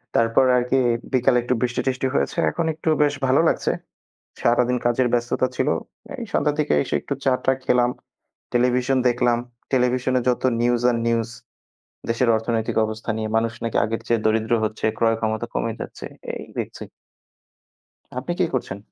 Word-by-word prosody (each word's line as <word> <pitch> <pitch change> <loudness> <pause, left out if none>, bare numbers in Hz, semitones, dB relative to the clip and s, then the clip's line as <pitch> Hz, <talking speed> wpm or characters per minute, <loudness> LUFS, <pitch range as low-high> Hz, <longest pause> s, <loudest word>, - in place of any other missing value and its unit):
তারপর 115 +3 +4
আরকি 125 +2 +1 0.4
বিকালে 125 0 +4
একটু 125 - 0
বৃষ্টি-টৃষ্টি 130 +1 0
হয়েছে। - - 0
এখন 170 - -2
একটু 160 +1 -3
বেশ 145 -1 +2
ভালো 135 +5 +4
লাগছে। - - 0 0.7
সারাদিন 125 +1 +3
কাজের 120 +1 +2
ব্যস্ততা 120 +2 +1
ছিল। - - +1 0.5
এই 235 - -4
সন্ধ্যার 150 0 +1
দিকে 150 - +1
এসে, - - -4
একটু 140 - -3
চা-টা 130 0 +2
খেলাম। 125 0 +3 0.6
টেলিভিশন 125 +2 +2
দেখলাম। 120 -1 +2 0.3
টেলিভিশনে 130 0 +2
যত 125 - +1 0.2
নিউজ 120 0 +2
আর 120 - 0
নিউজ 115 -1 +1 0.8
দেশের 115 +1 +2
অর্থনৈতিক 110 0 -2
অবস্থা 110 +1 -6
নিয়ে। 110 -1 -3
মানুষ 115 0 0
নাকি 115 - -1
আগের 115 +1 -3
চেয়ে 115 -2 +1
দরিদ্র 110 +1 +2
হচ্ছে, 110 0 -3
ক্রয় 115 -1 +3
ক্ষমতা 110 +1 -1
কমে 115 - -1
যাচ্ছে। - - -7 0.3
এই - - -7
দেখছি। - - -5 1.4
আপনি 140 +7 -3
কি - - +5
করছেন? 100 -6 -2
120 Hz, 150 wpm, -23 LUFS, 115-130 Hz, 1.4 s, কি